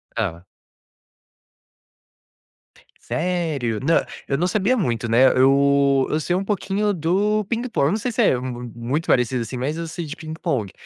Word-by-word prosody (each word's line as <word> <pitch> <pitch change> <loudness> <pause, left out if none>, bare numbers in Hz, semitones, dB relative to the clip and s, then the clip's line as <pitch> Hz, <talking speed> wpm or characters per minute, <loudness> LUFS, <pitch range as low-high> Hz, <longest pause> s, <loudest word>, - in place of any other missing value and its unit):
Ela. 90 -6 -3 2.6
Sério? 160 -10 -1
Não, 160 +4 +3 0.3
eu 140 - +1
não 175 +3 +1
sabia 215 +7 +1
muito, 120 - -1
né. 120 +3 +5
Eu 140 0 +4
eu 155 - 0
sei 175 - -1
um 195 - -2
pouquinho 205 0 0
do 200 +6 +1
ping-pong, 230 - 0
não 210 - +1
sei 240 +2 -3
se 240 - +1
é 130 - +4
mu 125 -1 -5
muito 125 +7 -3
parecido, 125 0 +2
assim, 125 +2 -5
mas 140 +5 -2
eu 165 0 -4
sei 165 +1 -5
de 150 - -7
ping-pong, 155 - -3
150 Hz, 155 wpm, -22 LUFS, 125-185 Hz, 2.6 s, né